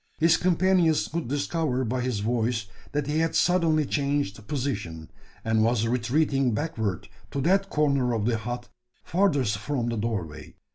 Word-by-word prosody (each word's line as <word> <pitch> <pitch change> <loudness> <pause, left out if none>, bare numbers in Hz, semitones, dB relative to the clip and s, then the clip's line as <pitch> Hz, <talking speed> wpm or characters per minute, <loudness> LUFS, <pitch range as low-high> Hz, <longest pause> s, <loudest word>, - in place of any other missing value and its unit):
His 165 +1 +5
companions 180 -2 +2
could 165 -4 -3
discover 140 -1 -1
by 125 +3 -1
his 125 -5 -1
voice 115 0 0 0.3
that 145 -1 -1
he 150 +2 0
had 165 0 0
suddenly 165 -4 +3
changed 140 -8 -1
position, 105 - -4 0.3
and 110 -1 +2
was 115 -1 +2
retreating 125 +1 +1
backward 110 - -2 0.2
to 140 - -3
that 195 +6 +2
corner 140 -5 +2
of 105 -2 -1
the 115 -1 +1
hut 120 +2 -5 0.4
furthest 145 - +1
from 120 0 -2
the 115 - -2
doorway. 90 -9 -4
130 Hz, 150 wpm, -26 LUFS, 110-155 Hz, 0.4 s, His